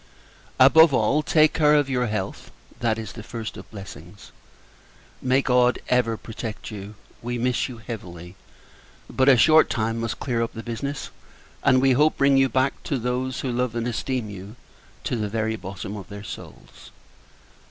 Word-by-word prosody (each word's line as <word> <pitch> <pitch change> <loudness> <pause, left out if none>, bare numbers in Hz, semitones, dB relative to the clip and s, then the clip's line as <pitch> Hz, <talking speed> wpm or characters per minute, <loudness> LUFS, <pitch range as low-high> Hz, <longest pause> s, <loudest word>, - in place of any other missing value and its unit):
Above 145 +3 +7
all, 125 +8 +2
take 155 0 +3
care 150 -1 +4
of 145 -2 +3
your 125 -2 0
health; 105 -3 -4 0.3
that 115 -2 0
is 110 -3 -6
the 110 - -9
first 115 0 -6
of - - -11
blessings. 95 -2 -11 0.9
May 130 +1 +2
God 125 -1 +3
ever 120 -3 +2
protect 110 0 -7
you! 105 0 -8 0.3
We 120 +1 -3
miss 125 +2 0
you 125 - -8
heavily: 90 -6 -9 0.7
but, 130 +1 +2
a 130 - +7
short 155 +7 +6
time 115 0 -1
must 115 0 -3
clear 120 -4 -1
up 115 - -2
the 115 - -7
business; 135 +5 -5 0.5
and, 130 -1 +4
we 135 - +5
hope, 150 +5 +3
bring 140 0 +4
you 135 0 +4
back 130 +1 0
to 140 - -1
those 125 +2 -2
who 130 - -2
love 120 -1 -1
and 115 0 -2
esteem 125 0 -2
you 100 +3 -9 0.5
to - - -2
the 105 -3 -2
very 110 +1 -1
bottom 100 0 -7
of 100 -3 -9
their 100 0 -8
souls. - - -11
120 Hz, 175 wpm, -24 LUFS, 110-130 Hz, 0.9 s, Above